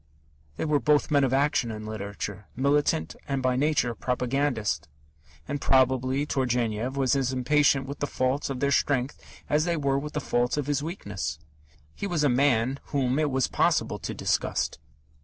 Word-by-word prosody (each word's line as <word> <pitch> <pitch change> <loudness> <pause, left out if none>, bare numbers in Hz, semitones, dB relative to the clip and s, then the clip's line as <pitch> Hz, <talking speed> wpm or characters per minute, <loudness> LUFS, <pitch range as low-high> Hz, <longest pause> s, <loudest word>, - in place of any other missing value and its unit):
They - - -3
were 150 -2 +2
both 150 +1 +2
men 145 -2 +4
of 130 - +2
action 135 -3 +2
in 110 -1 -6
literature, 105 -1 -6
militant, 140 - +1
and 135 -2 -1
by 130 0 +2
nature 135 -3 +1
propagandist. 125 - -1 0.6
And 140 0 -3
probably 130 +1 +2
Turgenev 125 -2 -1
was 135 -1 +2
as 135 -2 0
impatient 135 +1 +2
with 140 +1 -7
the 145 - -1
faults 130 +2 -1
of 130 -2 -4
their 140 0 +2
strength 135 -2 +1 0.3
as 150 +2 +2
they 170 -1 0
were 140 -2 +1
with 150 +1 -6
the 150 - -1
faults 120 -1 0
of 145 - -1
his 145 0 0
weakness. 100 - -4 0.6
He 200 - -4
was 170 -5 0
a 145 - +4
man 130 0 +2
whom 135 -1 0
it 155 -1 +2
was 130 -1 +1
possible - - +1
to - - -5
disgust. - - -1
135 Hz, 175 wpm, -27 LUFS, 125-145 Hz, 0.6 s, men